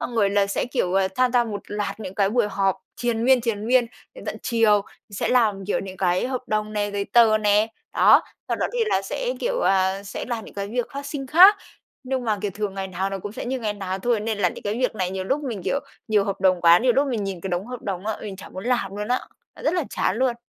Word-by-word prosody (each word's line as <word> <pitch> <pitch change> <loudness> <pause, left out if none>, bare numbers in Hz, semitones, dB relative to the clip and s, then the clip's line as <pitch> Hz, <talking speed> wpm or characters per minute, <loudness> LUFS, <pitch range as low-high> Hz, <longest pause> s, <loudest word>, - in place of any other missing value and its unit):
xong 245 - -4
rồi 200 -3 +3
là 200 -1 +2
sẽ, 200 - -1
kiểu, 240 -8 -1
ờ, 190 -1 +3
tham 255 -1 +2
gia 245 -1 +4
một 210 -3 -5
loạt 205 +1 -4
những 190 -2 -6
cái 195 -1 +2
buổi 235 -2 +2
họp 195 -1 +1 0.2
triền 235 -1 -1
miên, 260 -1 +5
triền 220 -3 -2
miên 245 0 +4 0.3
đến - - -11
tận - - -4
chiều, 225 -4 +3 0.3
sẽ 200 - -2
làm 215 -6 +2
kiểu 205 - 0
những 190 -1 -8
cái 180 +3 +1
hợp 255 -1 -2
đồng 215 0 -1
này, 205 -1 -1
giấy 200 0 -1
tờ 225 0 +5
nè, 210 0 +3 0.3
đó. - - +6 0.3
Sau - - 0
đó - - 0
thì - - -3
là - - +1
sẽ, - - -3
kiểu, - - -1
à, 190 - +2
sẽ 200 - -6
làm 230 -3 -3
những - - -13
cái 200 0 -3
việc 245 +1 -1
phát 280 0 -6
sinh 280 -2 -5
khác. 370 +9 +8 0.5
Nhưng 260 -1 -2
mà, 215 -2 0
kiểu, 205 - -1
thường 205 -2 -3
ngày 195 0 -3
nào 190 +2 -2
nó 195 - -3
cũng 205 +2 -7
sẽ - - -6
như 260 +1 -2
ngày 215 -2 -1
nào 195 -2 -4
thôi 235 +2 +1
nên 220 0 -2
là 185 -3 +3
những - - -10
cái 205 +1 -2
việc 250 -2 0
này 185 -3 -2
nhiều 190 0 -4
lúc 275 +9 0
mình, 230 -7 -4
kiểu, 280 - 0 0.3
nhiều 210 -2 +3
hợp 200 -2 -3
đồng 185 -2 +3
quá, 170 0 +7
nhiều 250 +3 +3
lúc 275 +3 +2
mình 220 -5 -1
nhìn 190 -3 -4
cái 195 - -5
đống 175 +3 -2
hợp 250 -1 -7
đồng 195 0 -4
á, 220 - -1
mình 200 -3 -6
chả - - -10
muốn 185 +3 -8
làm 205 -6 -1
luôn 210 +2 -4
á, 250 - +1 0.4
rất 320 - +1
là 345 -5 0
chán 185 - 0
luôn. 255 0 +1
210 Hz, 275 wpm, -23 LUFS, 195-245 Hz, 0.5 s, khác